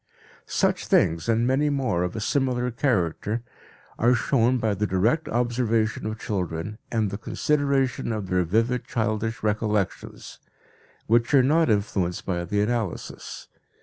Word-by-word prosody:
Such - - 0
things, 80 +5 +2
and 115 +1 +2
many 135 +4 +2
more 130 -11 0
of 90 +2 -2
a - - -2
similar 125 +1 0
character, 115 - 0 0.6
are 120 +2 +4
shown 120 +1 +2
by 110 -3 0
the 105 +1 -1
direct 110 - +1
observation 115 -2 0
of 110 0 -4
children 95 +1 -3
and 110 -4 0
the 100 - -5
consideration 140 -1 0
of 105 -3 -3
their 90 0 +1
vivid 115 +8 0
childish 110 0 -2
recollections, 105 -2 -2 0.7
which 120 +4 +3
are 135 - +6
not 160 +3 +3
influenced 100 -4 0
by 85 -2 -1
the 100 +4 0
analysis. 110 -4 -3
110 Hz, 140 wpm, -25 LUFS, 100-125 Hz, 0.7 s, are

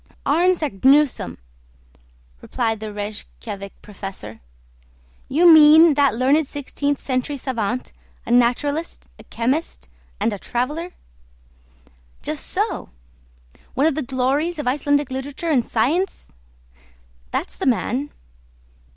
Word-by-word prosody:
"Arne 350 +6 +3
Saknussemm!" 275 - +2 1.0
replied 225 -4 -2
the 215 0 -6
Rejkiavik 205 -1 -7
professor. 190 - -8 0.9
"You 330 +6 +4
mean 315 0 +8
that 280 -4 +2
learned 275 +5 +2
sixteenth 285 0 -3
century 260 +2 -2
savant, 245 -2 -3 0.3
a - - -4
naturalist, 265 +7 +1
a - - -12
chemist, 255 - -2 0.3
and 225 - 0
a 200 - -6
traveller?" 300 - -3 1.3
"Just - - -3
so!" - - -2 0.9
"One 275 - +2
of 320 - +3
the 310 - -2
glories 275 +6 -1
of 295 - -4
Icelandic 285 +1 +1
literature 285 +5 -4
and 255 -5 +3
science?" 315 - -1 1.0
"That's - - -4
the - - -3
man." 255 +3 0
270 Hz, 110 wpm, -21 LUFS, 235-300 Hz, 1.3 s, mean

